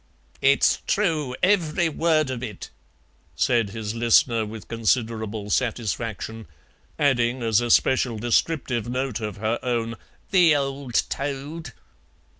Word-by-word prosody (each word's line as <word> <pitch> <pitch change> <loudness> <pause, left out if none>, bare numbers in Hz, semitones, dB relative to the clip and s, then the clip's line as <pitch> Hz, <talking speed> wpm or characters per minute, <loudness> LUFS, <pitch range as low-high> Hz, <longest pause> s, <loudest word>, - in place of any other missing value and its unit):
"It's 140 +1 +4
true, 155 -10 0
every 175 -3 +2
word 155 -3 +1
of 125 -2 -4
it," 110 -6 -7 0.6
said 115 -4 +2
his 105 0 -5
listener 115 -1 +3
with 110 0 -9
considerable 110 -2 -1
satisfaction, 115 -3 -2 0.5
adding 125 -3 +1
as 115 -1 +3
a 120 - -2
special 125 -1 +3
descriptive 120 0 0
note 125 -2 -2
of 105 -3 -5
her 110 +3 -1
own, 115 -2 -1 0.4
"the 175 -5 +5
old 135 -3 -1
toad." 145 +4 -5
120 Hz, 115 wpm, -24 LUFS, 115-140 Hz, 0.6 s, the